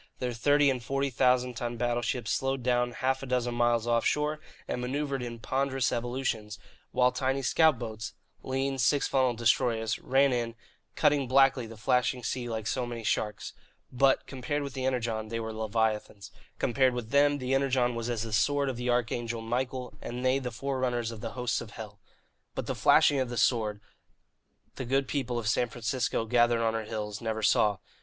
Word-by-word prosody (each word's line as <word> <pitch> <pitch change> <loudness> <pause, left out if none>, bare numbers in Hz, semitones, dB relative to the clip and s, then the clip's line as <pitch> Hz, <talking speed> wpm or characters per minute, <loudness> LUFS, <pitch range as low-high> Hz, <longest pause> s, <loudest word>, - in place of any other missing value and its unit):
Their 125 -1 -2
thirty 145 +4 +3
and 125 -2 -4
forty 135 +2 -1
thousand 125 0 +2
ton 120 0 -4
battleships 120 0 -1
slowed 135 -1 -1
down 120 0 +2
half 130 +2 -1
a 135 - -6
dozen 125 -1 0
miles 120 -1 +2
offshore 150 +6 +1 0.3
and 125 - -3
manoeuvred 135 +1 -2
in 120 -1 -5
ponderous 135 +2 0
evolutions, 120 -3 -2 0.3
while 125 0 +3
tiny 130 +2 -1
scout 155 +2 +4
boats 110 -1 -6 0.3
(lean, 135 +1 -2
six 130 +5 +3
funnelled 130 -3 +1
destroyers) 115 -1 +1
ran 135 0 +3
in, 115 -1 -2 0.4
cutting 145 -4 +2
blackly 135 -3 +4
the 115 - -10
flashing 125 +2 +1
sea 120 0 -3
like 110 -2 -3
so 125 +2 -1
many 120 -1 -6
sharks. 105 0 -2 0.4
But, 135 +1 +3
compared 140 +3 -3
with 140 -2 -6
the 130 -1 -3
Energon, 115 -4 -1
they 115 +1 -3
were 110 -1 -4
leviathans. 110 -2 -2 0.3
Compared 130 0 +2
with 120 -2 -5
them, 145 0 +4
the 130 -1 -2
Energon 130 -2 +2
was 115 0 -3
as 115 -2 -1
the 115 -1 -6
sword 140 +5 +2
of 130 - -4
the 125 +1 -2
arch 120 -1 +1
angel 115 -1 -3
Michael, 125 +2 -3
and 125 +1 -5
they 130 +1 +3
the 130 -2 -4
forerunners 125 -2 -2
of 110 -2 -9
the - - -5
hosts 125 -3 -1
of 110 -3 -10
hell. 105 -2 -9 0.6
But - - -3
the - - -2
flashing 145 - +4
of 130 -2 -1
the 120 - -5
sword, 110 -5 +1 1.0
the 130 - -4
good 135 +2 +1
people 125 -4 -2
of 115 -2 -3
San 120 +2 +1
Francisco, 120 0 -1
gathered 120 0 +3
on 115 0 +1
her 110 -1 -3
hills, 105 -1 -5
never 110 -1 -3
saw. 105 -1 +3
125 Hz, 185 wpm, -29 LUFS, 115-130 Hz, 1.0 s, scout